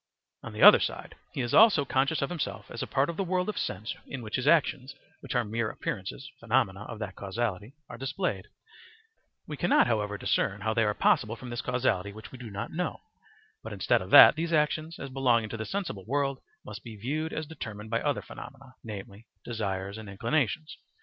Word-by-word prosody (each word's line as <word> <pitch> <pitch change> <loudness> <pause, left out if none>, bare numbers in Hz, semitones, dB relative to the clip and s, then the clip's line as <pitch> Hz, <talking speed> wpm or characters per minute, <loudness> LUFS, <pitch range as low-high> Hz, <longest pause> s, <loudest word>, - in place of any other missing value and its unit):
On - - -8
the - - -1
other - - +11
side - - -4 0.2
he - - -3
is 120 -1 -3
also 205 -10 +7
conscious 140 +3 +1
of 140 - -2
himself 170 -5 -4
as - - -5
a - - -3
part 135 +1 +1
of 170 - -5
the 195 - 0
world 180 0 0
of 215 - -4
sense 105 +5 -3
in 130 -3 -6
which 105 - -4
his 130 +2 -1
actions, 145 -4 +2 0.2
which - - -6
are 120 - +3
mere 110 +1 -1
appearances 125 - -5
[phenomena] 110 -4 0
of 115 - -7
that 100 -3 -6
causality, 105 +3 -3
are - - -10
displayed; 105 -7 -2 1.0
we 150 - -6
cannot, 175 - +4
however, 105 -3 -1
discern - - 0
how 110 - 0
they 115 -1 +2
are 105 0 0
possible 110 +2 +2
from 120 +1 -9
this 120 - -3
causality 120 -6 0
which 110 +1 -11
we 130 - -11
do 120 -2 -8
not 105 +3 -5
know; 180 +2 -3 0.6
but - - -7
instead - - +2
of - - -7
that, - - +10
these 165 +1 -2
actions 155 +1 0
as 135 - -7
belonging 120 -4 +2
to 115 - -5
the 110 - -4
sensible 180 - -4
world 140 0 0 0.3
must 105 0 -8
be 115 -2 -9
viewed 155 +9 -2
as 155 - -3
determined 110 -8 -8
by 115 - +1
other - - -1
phenomena, 130 0 -11
namely, 105 0 -9 0.2
desires 100 -3 -3
and 110 -2 -9
inclinations. 140 +8 -1
120 Hz, 205 wpm, -28 LUFS, 105-145 Hz, 1.0 s, other